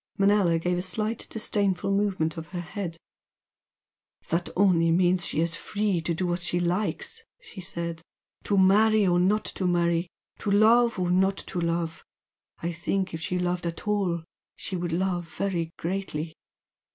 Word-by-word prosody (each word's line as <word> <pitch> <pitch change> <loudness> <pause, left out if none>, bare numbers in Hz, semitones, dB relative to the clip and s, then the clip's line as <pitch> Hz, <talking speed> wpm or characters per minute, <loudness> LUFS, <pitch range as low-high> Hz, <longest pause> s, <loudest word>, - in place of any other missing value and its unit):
Manella 195 -4 +4
gave 175 +2 0
a - - -1
slight 215 +5 -2
disdainful 200 -3 0
movement 195 -6 +1
of 165 0 -7
her 180 0 -5
head. 175 -1 -5 1.3
"That 170 +2 0
only 180 -4 +4
means 175 +1 +3
she 155 - 0
is 170 0 0
free 205 -3 -1
to 165 +1 -1
do 175 0 0
as 175 0 -3
she 175 0 0
likes" 180 +4 -1 0.2
she 230 - -10
said 170 -1 -4 0.4
"To 200 - +1
marry 210 +3 +5
or 175 -1 +3
not 205 +4 +2
to 185 - -2
marry 170 0 +2 0.3
to - - -3
love 230 +4 +5
or 180 -1 0
not 190 +2 +3
to 180 - -3
love. 170 -1 -2 0.6
I 170 - 0
think 185 +3 -2
if 165 - -5
she 180 +3 -2
loved 180 -1 -1
at 170 +4 -6
all, 190 -5 0 0.3
she 190 - -5
would 175 -1 -2
love 175 0 -1
very 175 -5 -1
greatly. 170 -3 -3
180 Hz, 165 wpm, -27 LUFS, 170-195 Hz, 1.3 s, marry